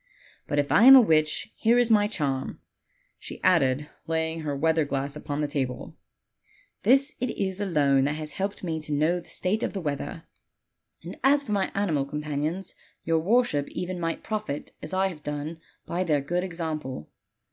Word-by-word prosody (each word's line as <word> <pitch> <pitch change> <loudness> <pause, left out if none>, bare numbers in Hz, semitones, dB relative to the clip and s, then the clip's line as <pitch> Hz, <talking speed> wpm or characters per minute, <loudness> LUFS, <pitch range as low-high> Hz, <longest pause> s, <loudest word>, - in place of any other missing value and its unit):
But 145 - -2
if 145 0 +1
I 230 - +6
am 270 +1 +11
a - - +11
witch, 155 +1 +1
here 230 +2 +3
is 240 -1 +3
my 205 -1 +5
charm," 140 -10 -2 0.6
she - - -9
added, 145 -4 +3 0.2
lay 160 0 0
ing 165 - -6
her 150 -3 -3
weather 160 +2 +2
glass 140 0 -3
upon 150 -1 -4
the 150 - 0
table; 130 -4 -4 0.9
"this 270 +6 +4
it 250 - 0
is 190 0 -2
alone 140 -8 +2
that 145 +2 0
has 155 -1 -5
helped 195 +4 -4
me 160 -3 -2
to 150 -1 -5
know 155 +5 +2
the - - -15
state 195 +4 -1
of - - -2
the 200 - -3
weather. 145 -5 -4 0.8
And 175 +3 -9
as 280 +2 +4
for 220 - -7
my 200 -2 0
animal 165 -9 0
companions, 150 +5 -3 0.3
your 165 0 +2
worship 190 - +1
even 180 0 -4
might 165 -1 -3
profit 215 -10 -4
as - - -7
I 190 0 +1
have 175 -6 -4
done 150 +2 -5 0.3
by 180 +2 -1
their 155 -5 +2
good 175 +6 -1
example. 160 - -5
160 Hz, 185 wpm, -26 LUFS, 145-195 Hz, 0.9 s, am